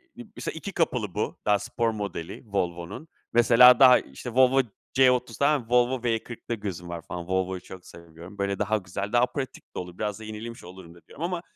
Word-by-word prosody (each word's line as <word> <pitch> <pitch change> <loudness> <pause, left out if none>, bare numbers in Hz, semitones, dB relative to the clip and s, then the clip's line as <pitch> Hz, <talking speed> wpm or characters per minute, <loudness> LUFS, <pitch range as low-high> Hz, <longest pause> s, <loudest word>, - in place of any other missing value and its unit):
m 245 - -10
mesela - - -4
2 195 +5 -6
kapılı 125 - -1
bu, 105 - -2
daha 105 -1 +3
spor 115 +1 -1
modeli 100 -6 -6
Volvo'nun. 95 - -4 0.3
Mesela, 120 +2 +7
daha, 130 -2 +8
işte, 70 - -9
Volvo 130 +1 +5 0.3
C30 125 -3 +3
tamam 145 -1 +3
mı, 115 - -17
Volvo 125 +1 +3
V40'ta 120 0 -3
gözüm 95 -6 -6
var 85 -1 -5
falan; 85 +1 -7
Volvo'yu 95 0 -1
çok 95 -1 -12
seviyorum. 85 +3 -13
Böyle 100 -1 -2
daha 110 - +1
güzel, 100 +2 -5
daha 120 +1 +5
pratik 130 +1 -7
de - - -3
olur. 90 0 -8
Biraz 105 -1 -3
da 110 - -10
yenilemiş 110 +2 -8
olurum 90 -1 -12
da 85 - -17
diyorum 160 - -9
ama 175 -1 -3
110 Hz, 195 wpm, -26 LUFS, 95-125 Hz, 0.3 s, daha